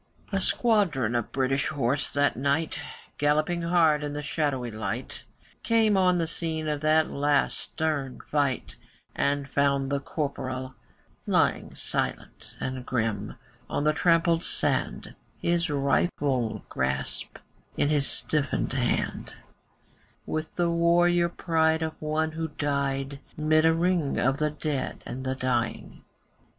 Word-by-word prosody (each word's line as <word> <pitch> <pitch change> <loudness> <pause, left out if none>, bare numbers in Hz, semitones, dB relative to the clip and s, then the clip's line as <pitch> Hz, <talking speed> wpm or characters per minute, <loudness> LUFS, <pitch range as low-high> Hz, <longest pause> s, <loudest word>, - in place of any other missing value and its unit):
A 195 -1 0
squadron 185 - +2
of 120 -2 -1
British 135 +1 +1
horse 140 -1 0
that 145 0 +1
night, 140 +5 0 0.4
Galloping 155 +4 +2
hard 165 -3 +3
in 145 -1 -3
the 150 0 -4
shadowy 140 -5 -1
light, 110 0 -5 0.4
Came 225 -2 +3
on 180 -2 +4
the 170 - +1
scene 160 -1 -3
of 150 -1 -1
that 155 +1 +3
last 145 0 +1
stern 145 -5 -2
fight, 145 -3 -1 0.4
And 140 0 0
found 140 -1 +1
the 140 - +1
Corporal 130 -3 -4 0.5
lying - - +1
Silent - - -3
and 130 -1 -4
grim 110 -4 -2 0.3
on - - -1
the 150 0 +3
trampled 165 +1 +3
sand, - - 0 0.3
His 170 0 +1
rifle 140 -4 0
grasped 65 +1 -3 0.4
in 145 - +2
his 145 -2 +2
stiffened 145 -4 0
hand, 125 -2 -1 0.9
With 155 0 -4
the 175 -1 +1
warrior 170 +1 +3
pride 160 -2 +1
of 160 0 -2
one 155 +1 0
who 160 +1 -3
died 140 -2 -2 0.2
'Mid 155 +1 +3
a 165 - +5
ring 170 -3 +1
of 135 +2 +2
the 150 0 +1
dead 150 -2 -3
and 130 +2 -6
the 130 0 -1
dying. 120 -4 -2
150 Hz, 130 wpm, -27 LUFS, 135-165 Hz, 0.9 s, a